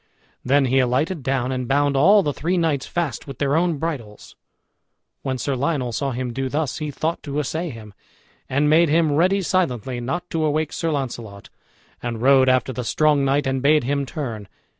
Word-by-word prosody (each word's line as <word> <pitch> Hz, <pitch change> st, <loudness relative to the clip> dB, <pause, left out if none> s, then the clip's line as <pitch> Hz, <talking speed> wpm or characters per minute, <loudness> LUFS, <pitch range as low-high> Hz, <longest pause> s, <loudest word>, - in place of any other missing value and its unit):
Then 140 Hz, +2 st, +3 dB
he 130 Hz, +1 st, +2 dB
alighted 140 Hz, +7 st, 0 dB
down 130 Hz, -1 st, -1 dB
and 130 Hz, -1 st, -3 dB
bound 140 Hz, +1 st, +2 dB
all 195 Hz, +9 st, +5 dB
the 145 Hz, -, -1 dB
three 175 Hz, +6 st, -1 dB
knights 155 Hz, -5 st, 0 dB
fast 170 Hz, -6 st, -3 dB
with 135 Hz, -3 st, -8 dB
their 140 Hz, 0 st, +1 dB
own 170 Hz, -1 st, +1 dB
bridles. 135 Hz, -10 st, -6 dB, 0.9 s
When 130 Hz, -1 st, -2 dB
Sir 135 Hz, +3 st, -2 dB
Lionel 130 Hz, -2 st, -1 dB
saw 140 Hz, +4 st, -2 dB
him 125 Hz, -1 st, -4 dB
do 135 Hz, +1 st, -2 dB
thus, 150 Hz, 0 st, -2 dB
he 150 Hz, -1 st, -3 dB
thought 160 Hz, +3 st, -2 dB
to 145 Hz, -1 st, -5 dB
assay 160 Hz, +4 st, -2 dB
him, 110 Hz, -5 st, -10 dB, 0.6 s
and 145 Hz, +3 st, +2 dB
made 160 Hz, +2 st, +4 dB
him 160 Hz, 0 st, +3 dB
ready 185 Hz, +6 st, +2 dB
silently, 130 Hz, -, -1 dB
not 170 Hz, +9 st, -3 dB
to 160 Hz, -1 st, 0 dB
awake 155 Hz, 0 st, 0 dB
Sir 165 Hz, -, -2 dB
Launcelot, 120 Hz, -8 st, -5 dB, 0.5 s
and 120 Hz, -2 st, -4 dB
rode 130 Hz, +1 st, +5 dB
after 130 Hz, 0 st, +1 dB
the 125 Hz, -, -4 dB
strong 150 Hz, +3 st, +2 dB
knight, 140 Hz, +2 st, +1 dB
and 135 Hz, 0 st, -1 dB
bade 150 Hz, +1 st, +4 dB
him 140 Hz, +2 st, -1 dB
turn. 115 Hz, -, -5 dB
140 Hz, 190 wpm, -22 LUFS, 130-155 Hz, 0.9 s, all